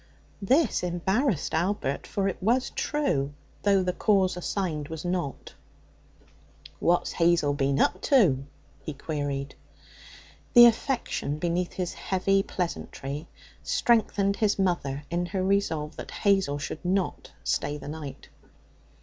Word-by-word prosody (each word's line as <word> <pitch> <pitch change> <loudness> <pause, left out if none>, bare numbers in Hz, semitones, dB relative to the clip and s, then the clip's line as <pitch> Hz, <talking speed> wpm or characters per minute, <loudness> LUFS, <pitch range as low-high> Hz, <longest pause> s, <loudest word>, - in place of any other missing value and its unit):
This 270 +11 +2
embarrassed 180 - 0
Albert, 170 -4 -1
for 195 -1 -1
it 190 - -3
was 240 +6 +1
true, 145 - -1 0.3
though 200 -2 +3
the 180 0 0
cause 190 -2 +2
assigned 175 -5 -2
was 160 +1 -7
not. 175 -6 -3 1.3
'What's 175 +1 +2
Hazel 165 -4 +3
been 140 -1 0
up 185 - +2
to?' 170 - +3 0.4
he 150 +2 -5
queried. 140 -2 -3 1.0
The 240 0 +11
affection 235 - +1
beneath 175 +2 -1
his 180 -2 -3
heavy 195 +1 +1
pleasantry 160 -5 -4 0.3
strengthened 205 -4 +2
his 210 -2 +2
mother 170 -7 -1
in 175 +1 0
her 190 0 -2
resolve 170 -6 0
that - - -7
Hazel 195 -8 +1
should 145 +2 -6
not 185 +1 -1
stay 145 +1 -1
the 145 - -10
night. 145 -3 -7
180 Hz, 125 wpm, -27 LUFS, 150-195 Hz, 1.3 s, The